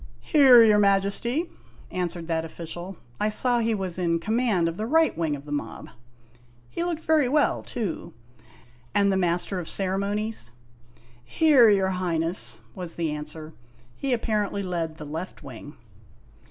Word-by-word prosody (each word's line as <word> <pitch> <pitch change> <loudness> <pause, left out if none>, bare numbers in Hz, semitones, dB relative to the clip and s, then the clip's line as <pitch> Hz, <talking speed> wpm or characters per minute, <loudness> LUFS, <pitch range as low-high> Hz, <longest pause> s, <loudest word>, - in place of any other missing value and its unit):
" - - -33
Here, 265 -6 +8
your 210 -2 +5
Majesty," 200 - +1 0.5
answered* 175 -2 -3
that 165 -1 -1
official. 175 +3 -7 0.2
I 210 - +1
saw 240 +3 +4
he 225 -1 0
was 185 -3 -4
in 170 -2 +1
command 215 -2 0
of 165 - -3
the 215 +4 -4
right 320 +4 +3
wing 160 -3 -1
of 140 0 -11
the 145 - -10
mob. 145 - -5 0.8
He 340 - -3
looked 335 -2 -3
very 310 -5 +2
well, 295 +2 +2
too 190 -6 -5 0.4
" 120 0 -28
And 200 -1 +3
the - - +1
Master 180 +1 0
of 170 - -5
Ceremonies? 200 - -1 0.3
' 120 0 -29
" 120 0 -28
Here, 265 - +5
your 195 -2 +3
Highness," 165 -10 -2
was 175 +1 -5
the 165 -2 -2
answer. 155 +1 -7 0.4
He 275 - -3
apparently 210 -4 -1
led 165 -4 -3
the 150 - -8
left 160 +3 -7
wing. 140 +2 -11
185 Hz, 165 wpm, -25 LUFS, 160-220 Hz, 0.8 s, Here